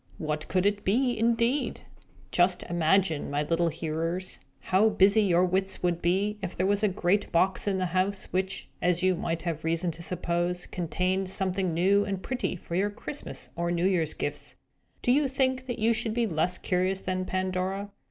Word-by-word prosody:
What 155 Hz, -4 st, -3 dB
could 185 Hz, 0 st, +1 dB
it 205 Hz, 0 st, +1 dB
be, 245 Hz, +5 st, +2 dB
indeed? 235 Hz, +4 st, +1 dB, 0.5 s
Just 180 Hz, +1 st, +2 dB
imagine, 175 Hz, -1 st, +1 dB
my 145 Hz, +1 st, 0 dB
little 170 Hz, +2 st, +1 dB
hearers, 165 Hz, +3 st, -3 dB, 0.2 s
how 195 Hz, +4 st, +3 dB
busy 205 Hz, +1 st, +5 dB
your 180 Hz, -3 st, +4 dB
wits 190 Hz, +1 st, -1 dB
would 175 Hz, -1 st, +1 dB
be, 200 Hz, +5 st, +1 dB
if 190 Hz, -2 st, -4 dB
there 185 Hz, -, +1 dB
were 200 Hz, +1 st, +3 dB
a 215 Hz, -, +4 dB
great 190 Hz, +1 st, 0 dB
box 185 Hz, +4 st, +2 dB
in 195 Hz, -1 st, +1 dB
the 185 Hz, -, 0 dB
house, 185 Hz, +3 st, 0 dB
which, 190 Hz, +1 st, -2 dB
as 175 Hz, 0 st, +1 dB
you 185 Hz, 0 st, +4 dB
might 165 Hz, -1 st, -3 dB
have 165 Hz, -3 st, -3 dB
reason 165 Hz, +2 st, 0 dB
to 165 Hz, -, -10 dB
suppose, 175 Hz, 0 st, -1 dB
contained 185 Hz, +2 st, -1 dB
something 190 Hz, -1 st, -1 dB
new 190 Hz, +5 st, +3 dB
and 195 Hz, -2 st, -4 dB
pretty 250 Hz, -7 st, -2 dB
for 170 Hz, -, -9 dB
your 195 Hz, +4 st, +2 dB
Christmas 220 Hz, +7 st, -6 dB
or 170 Hz, 0 st, -1 dB
New 175 Hz, +1 st, 0 dB
Year's 170 Hz, -5 st, +1 dB
gifts. 145 Hz, 0 st, -3 dB, 0.5 s
Do 245 Hz, -, +3 dB
you 285 Hz, +2 st, +4 dB
think 260 Hz, -1 st, 0 dB
that 245 Hz, -, -3 dB
you 230 Hz, +1 st, +3 dB
should 225 Hz, -1 st, -1 dB
be 240 Hz, -1 st, +2 dB
less 175 Hz, -2 st, 0 dB
curious 185 Hz, +1 st, 0 dB
than 185 Hz, 0 st, -2 dB
Pandora? 185 Hz, +2 st, -2 dB
185 Hz, 185 wpm, -28 LUFS, 175-205 Hz, 0.5 s, busy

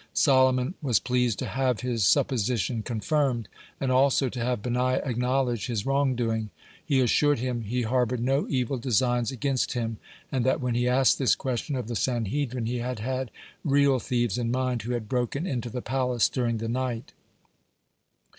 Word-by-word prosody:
Solomon 130 Hz, +1 st, +3 dB
was 125 Hz, -8 st, +2 dB
pleased 125 Hz, -3 st, 0 dB
to -, -, -3 dB
have 130 Hz, -3 st, 0 dB
his 120 Hz, -4 st, -1 dB
supposition 120 Hz, -1 st, +1 dB
confirmed, 120 Hz, +1 st, -1 dB, 0.3 s
and 135 Hz, -1 st, 0 dB
also 135 Hz, 0 st, +3 dB
to 125 Hz, -, -6 dB
have 120 Hz, -3 st, -1 dB
Benaiah 125 Hz, +1 st, +1 dB
acknowledge 125 Hz, -2 st, 0 dB
his 115 Hz, -5 st, -2 dB
wrong 135 Hz, -1 st, +2 dB
doing. 110 Hz, -3 st, -1 dB, 0.3 s
he 140 Hz, -4 st, +1 dB
assured 145 Hz, +4 st, +3 dB
him 120 Hz, 0 st, -2 dB
he 120 Hz, +3 st, -2 dB
harbored 125 Hz, +1 st, 0 dB
no 135 Hz, +4 st, +1 dB
evil 130 Hz, -1 st, -1 dB
designs 120 Hz, -1 st, +1 dB
against 135 Hz, 0 st, -1 dB
him, 115 Hz, -2 st, -2 dB, 0.3 s
and 130 Hz, -3 st, 0 dB
that 130 Hz, -, +2 dB
when 125 Hz, -3 st, -1 dB
he 120 Hz, +1 st, +1 dB
asked 130 Hz, +1 st, +3 dB
this 130 Hz, -, +3 dB
question 130 Hz, +2 st, -3 dB
of 125 Hz, -4 st, -3 dB
the 120 Hz, -, -4 dB
Sanhedrin, 120 Hz, +2 st, -1 dB
he 120 Hz, +2 st, -2 dB
had 125 Hz, 0 st, -3 dB
had 130 Hz, +3 st, -3 dB, 0.3 s
real 140 Hz, -2 st, +3 dB
thieves 120 Hz, -3 st, -1 dB
in 115 Hz, -1 st, -1 dB
mind, 125 Hz, -1 st, 0 dB
who 120 Hz, +3 st, -3 dB
had 115 Hz, -3 st, -3 dB
broken 125 Hz, -, -1 dB
into 125 Hz, -7 st, -3 dB
the 125 Hz, +1 st, -5 dB
palace 125 Hz, -2 st, +1 dB
during 120 Hz, -3 st, -1 dB
the 115 Hz, +1 st, -4 dB
night. 120 Hz, -1 st, -3 dB
125 Hz, 175 wpm, -27 LUFS, 120-130 Hz, 0.3 s, Solomon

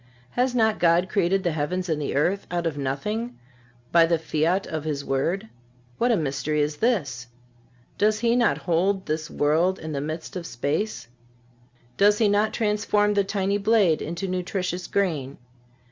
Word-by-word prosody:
Has 250 Hz, 0 st, 0 dB
not 220 Hz, -2 st, +2 dB
God 175 Hz, +2 st, +3 dB
created 195 Hz, -1 st, +1 dB
the 175 Hz, -, +1 dB
heavens 160 Hz, +5 st, -2 dB
and 155 Hz, -3 st, -1 dB
the 140 Hz, -, -3 dB
earth 180 Hz, +8 st, +1 dB
out 175 Hz, -1 st, -2 dB
of 165 Hz, -3 st, -1 dB
nothing 210 Hz, -, -3 dB, 0.5 s
by 165 Hz, -1 st, +6 dB
the 170 Hz, 0 st, +2 dB
fiat 160 Hz, +4 st, 0 dB
of 155 Hz, -2 st, -4 dB
His 145 Hz, -3 st, -3 dB
word? 170 Hz, +10 st, -1 dB, 0.5 s
What 240 Hz, +1 st, +3 dB
a 225 Hz, -, +3 dB
mystery 150 Hz, 0 st, -1 dB
is 150 Hz, 0 st, 0 dB
this! 145 Hz, -, 0 dB, 0.7 s
Does 215 Hz, +1 st, +2 dB
He 235 Hz, 0 st, +3 dB
not 245 Hz, -1 st, +3 dB
hold 190 Hz, +3 st, 0 dB
this 155 Hz, +1 st, -3 dB
world 165 Hz, +6 st, +1 dB
in 160 Hz, -, -7 dB
the 140 Hz, -2 st, -2 dB
midst 155 Hz, +4 st, -5 dB
of 175 Hz, -3 st, -5 dB
space? 145 Hz, -, -2 dB, 0.9 s
Does 205 Hz, +1 st, +5 dB
He 220 Hz, -, +3 dB
not 205 Hz, +2 st, +2 dB
transform 210 Hz, -1 st, +1 dB
the 200 Hz, -1 st, +2 dB
tiny 200 Hz, 0 st, -1 dB
blade 200 Hz, -6 st, +3 dB
into 170 Hz, +4 st, -4 dB
nutritious 180 Hz, 0 st, -3 dB
grain? 155 Hz, -9 st, -1 dB
180 Hz, 165 wpm, -25 LUFS, 155-205 Hz, 0.9 s, by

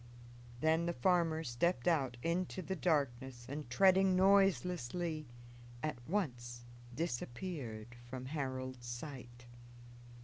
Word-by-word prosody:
Then 160 Hz, +2 st, +3 dB
the 170 Hz, -, 0 dB
farmer 165 Hz, +2 st, +2 dB
stepped 125 Hz, +3 st, 0 dB
out 135 Hz, -8 st, +2 dB
into 180 Hz, +2 st, -1 dB
the 190 Hz, -, -2 dB
darkness 130 Hz, -7 st, 0 dB
and, 145 Hz, -1 st, -5 dB
treading 190 Hz, +6 st, +5 dB
noiselessly, 180 Hz, -5 st, +2 dB, 0.6 s
at 155 Hz, -4 st, -1 dB
once 120 Hz, -11 st, -2 dB, 0.3 s
disappeared 120 Hz, -5 st, -4 dB
from 130 Hz, 0 st, -5 dB
Harold's 130 Hz, -3 st, -4 dB
sight. 120 Hz, -1 st, -7 dB
150 Hz, 100 wpm, -36 LUFS, 120-175 Hz, 0.6 s, treading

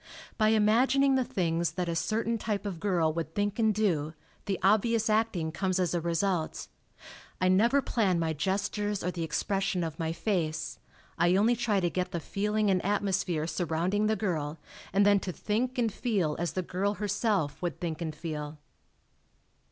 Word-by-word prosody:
By 215 Hz, -, +3 dB
imagining 240 Hz, +6 st, +4 dB
the 260 Hz, -1 st, +3 dB
things 170 Hz, -6 st, -1 dB
that 180 Hz, -1 st, -2 dB
a 170 Hz, -, -1 dB
certain 225 Hz, +5 st, 0 dB
type 210 Hz, -1 st, -2 dB
of 190 Hz, -5 st, -4 dB
girl 170 Hz, -5 st, +1 dB
would 165 Hz, -1 st, -4 dB
think 205 Hz, +2 st, -1 dB
and 220 Hz, -1 st, +4 dB
do, 170 Hz, -8 st, 0 dB, 0.3 s
the 195 Hz, -2 st, -1 dB
obvious 220 Hz, +3 st, +3 dB
acting 215 Hz, -7 st, +1 dB
comes 185 Hz, +2 st, -1 dB
as 180 Hz, -2 st, +1 dB
a 175 Hz, -, 0 dB
result. 170 Hz, 0 st, -1 dB, 0.7 s
I 185 Hz, -, +3 dB
never 235 Hz, +9 st, +4 dB
plan 195 Hz, -7 st, +1 dB
my 165 Hz, -1 st, 0 dB
gestures 200 Hz, +4 st, -1 dB
or 180 Hz, -, 0 dB
the 175 Hz, -, -5 dB
expression 190 Hz, +3 st, -1 dB
of 160 Hz, -1 st, -5 dB
my 160 Hz, -1 st, -1 dB
face 165 Hz, -4 st, -2 dB, 0.4 s
I 175 Hz, +1 st, +4 dB
only 220 Hz, +5 st, +4 dB
try 225 Hz, -4 st, +1 dB
to 175 Hz, -2 st, +1 dB
get 180 Hz, 0 st, -2 dB
the 170 Hz, -, -1 dB
feeling 210 Hz, +4 st, 0 dB
and 185 Hz, -1 st, +1 dB
atmosphere 190 Hz, -5 st, 0 dB
surrounding 175 Hz, +5 st, 0 dB
the 220 Hz, -, +2 dB
girl 165 Hz, -7 st, -2 dB, 0.3 s
and 200 Hz, +2 st, +3 dB
then 205 Hz, -1 st, +5 dB
to 190 Hz, -, -4 dB
think 240 Hz, +8 st, -2 dB
and 230 Hz, -4 st, +1 dB
feel 195 Hz, -12 st, 0 dB
as 175 Hz, 0 st, -2 dB
the 185 Hz, -, -1 dB
girl 195 Hz, +4 st, -1 dB
herself 205 Hz, -7 st, -1 dB
would 175 Hz, -1 st, -3 dB
think 165 Hz, -2 st, -4 dB
and 160 Hz, -2 st, -3 dB
feel." 150 Hz, -2 st, -5 dB
190 Hz, 175 wpm, -29 LUFS, 170-210 Hz, 0.7 s, then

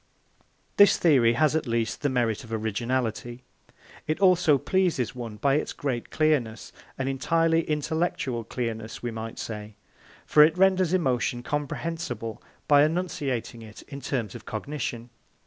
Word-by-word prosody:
This 200 Hz, -1 st, +7 dB
theory 130 Hz, -9 st, +4 dB
has 155 Hz, +4 st, +2 dB
at 160 Hz, -4 st, -1 dB
least 115 Hz, -1 st, -1 dB
the 145 Hz, -, +1 dB
merit 120 Hz, -4 st, 0 dB
of 115 Hz, -, -13 dB
originality. 120 Hz, +2 st, -2 dB, 0.6 s
It 155 Hz, -, -1 dB
also 180 Hz, -6 st, +5 dB
pleases 175 Hz, -, 0 dB
one 120 Hz, -4 st, -7 dB
by 135 Hz, +6 st, +2 dB
its -, -, -3 dB
great 130 Hz, -5 st, -3 dB
clearness 140 Hz, -8 st, 0 dB, 0.2 s
an 130 Hz, -, -2 dB
entirely 165 Hz, +5 st, +2 dB
intellectual 150 Hz, -5 st, -1 dB
clearness, 115 Hz, -1 st, -5 dB
we 120 Hz, -, -2 dB
may 115 Hz, 0 st, -6 dB
say; 105 Hz, -1 st, -7 dB, 0.5 s
for 150 Hz, -, +5 dB
it 155 Hz, +3 st, +5 dB
renders 185 Hz, -2 st, +3 dB
emotion 125 Hz, -8 st, 0 dB
comprehensible 145 Hz, -4 st, -4 dB, 0.3 s
by 145 Hz, -1 st, +6 dB
enunciating 150 Hz, -8 st, -2 dB
it 110 Hz, -1 st, -12 dB
in 140 Hz, -1 st, -9 dB
terms 120 Hz, -6 st, -3 dB
of 120 Hz, -, -9 dB
cognition. 120 Hz, -1 st, -5 dB
130 Hz, 140 wpm, -26 LUFS, 115-155 Hz, 0.6 s, This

